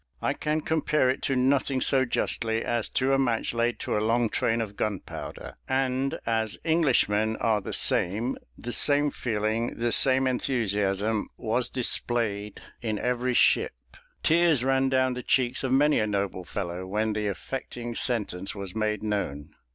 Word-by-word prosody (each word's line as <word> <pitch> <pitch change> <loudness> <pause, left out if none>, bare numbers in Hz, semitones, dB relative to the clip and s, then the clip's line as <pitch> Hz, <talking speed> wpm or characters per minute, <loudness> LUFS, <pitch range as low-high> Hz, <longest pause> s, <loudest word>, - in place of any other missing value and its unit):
I - - 0
can 155 +1 -1
compare 150 -4 +1
it 130 - -5
to 135 - +1
nothing 130 +1 +2
so 130 +1 +3
justly 115 -2 -1
as 120 -2 -1
to 135 +1 +1
a 135 - +3
match 120 -4 0
laid 120 +1 0
to - - -2
a 105 - +1
long 115 +1 +2
train 115 +1 0
of 105 -3 -4
gunpowder; 105 -4 -5
and 130 0 0
as 110 -2 -1
Englishmen 120 -10 +2
are 110 -2 +1
the - - -6
same, 110 +8 +2 0.2
the 120 0 -5
same 145 0 +4
feeling, 110 -1 -2
the 120 0 0
same 130 +1 +4
enthusiasm, 105 -5 0
was 115 +3 0
displayed 115 -4 -1 0.2
in 110 -3 -2
every 125 +2 -1
ship; - - +3 0.5
tears 165 -5 +3
ran 135 0 +2
down 130 -1 +2
the 125 - -5
cheeks 125 +1 +1
of 130 - -1
many 145 +3 +4
a 110 - +1
noble 100 -2 -2
fellow 90 -1 -5
when 110 +3 -1
the 105 0 -2
affecting 120 +3 -5
sentence 105 -7 -2
was 100 -2 -6
made 110 -1 -1
known. 80 -9 -3
120 Hz, 160 wpm, -27 LUFS, 105-130 Hz, 0.5 s, same